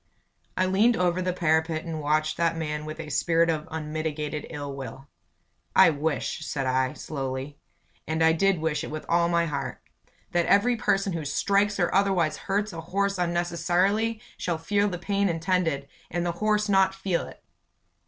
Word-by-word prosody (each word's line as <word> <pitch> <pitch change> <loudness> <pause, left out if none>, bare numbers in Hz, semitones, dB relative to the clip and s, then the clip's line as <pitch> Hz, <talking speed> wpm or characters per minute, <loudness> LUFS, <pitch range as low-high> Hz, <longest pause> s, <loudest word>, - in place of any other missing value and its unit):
I 185 - +3
leaned 210 +6 +3
over 180 0 +1
the 185 0 0
parapet 160 -2 +1
and 160 -2 -4
watched 155 +1 +1
that 165 -1 +1
man 150 -1 -3
with 155 +1 -7
a 155 -2 -6
spirit 165 +3 +3
of 155 -1 -3
unmitigated 155 -1 -3
ill 145 -3 -5
will. 135 0 -8 0.7
"I 190 -3 +8
wish," 150 +1 -2
said 140 -3 -2
I, 130 0 +1
slowly 135 0 -5 0.5
and 160 +1 +1
I 160 - +6
did 195 +2 +2
wish 155 -2 -1
it - - -5
with 155 0 -6
all 170 0 +3
my 170 -1 +2
heart 140 -4 -4 0.5
"that 175 -1 +1
every 240 +5 +4
person 195 -3 +1
who 165 -2 -3
strikes 200 +7 +1
or 175 - +1
otherwise 190 -5 +2
hurts 205 +1 -2
a 165 - -5
horse 195 +3 -1
unnecessarily, 180 +5 +1 0.2
shall 170 -2 -1
feel 200 +5 +1
the 180 - -4
pain 200 +2 0
intended 165 -4 0 0.2
and 175 +1 -2
the 175 - +1
horse 215 0 +2
not 190 -1 +3
feel 190 -3 -1
it!" - - -14
170 Hz, 175 wpm, -26 LUFS, 155-190 Hz, 0.7 s, I